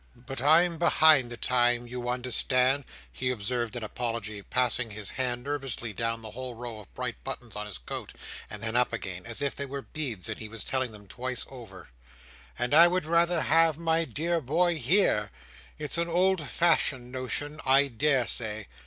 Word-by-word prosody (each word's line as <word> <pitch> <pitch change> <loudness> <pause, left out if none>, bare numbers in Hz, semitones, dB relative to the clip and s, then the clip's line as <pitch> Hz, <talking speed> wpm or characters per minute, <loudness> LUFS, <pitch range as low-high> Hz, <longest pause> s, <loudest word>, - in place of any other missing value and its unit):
"But 125 +1 -8
I'm 165 +4 +4
behind 155 -6 +5
the 120 - -7
time, 120 0 +2
you 120 0 -5
understand," 125 +2 +2 0.3
he 130 - -2
observed 120 0 -2
in 120 - -4
apology, 110 -2 -4
passing 125 +1 +1
his 105 -1 -3
hand 120 -2 -1
nervously 135 -5 -4
down 115 +2 -2
the 110 - -6
whole 125 +1 -6
row 115 -2 -7
of 105 - -14
bright 125 -2 -5
buttons 120 -4 -6
on 105 0 -4
his 100 -5 -6
coat, - - -7 0.4
and 105 0 -8
then 115 +1 -3
up 125 -1 +2
again, 95 -4 -5
as 115 +4 -3
if 140 - -1
they 140 - -4
were 140 0 -6
beads 125 - -5
and 110 - -5
he 110 - -7
were 115 - -9
telling 130 +3 -1
them 105 -2 -13
twice 125 +4 -3
over: 120 - -11 0.7
"and 120 +2 -1
I 165 +3 +9
would 180 -2 0
rather 170 +1 +3
have 165 0 +4
my 165 0 +2
dear 165 +2 -1
boy 165 +5 +1
here. 125 - +3 0.5
It's 150 +2 0
an 170 - 0
old 175 -3 +1
fashioned 135 -7 +2
notion, 145 +4 -4
I 135 +2 +4
daresay. 120 -5 0
125 Hz, 180 wpm, -28 LUFS, 115-150 Hz, 0.7 s, I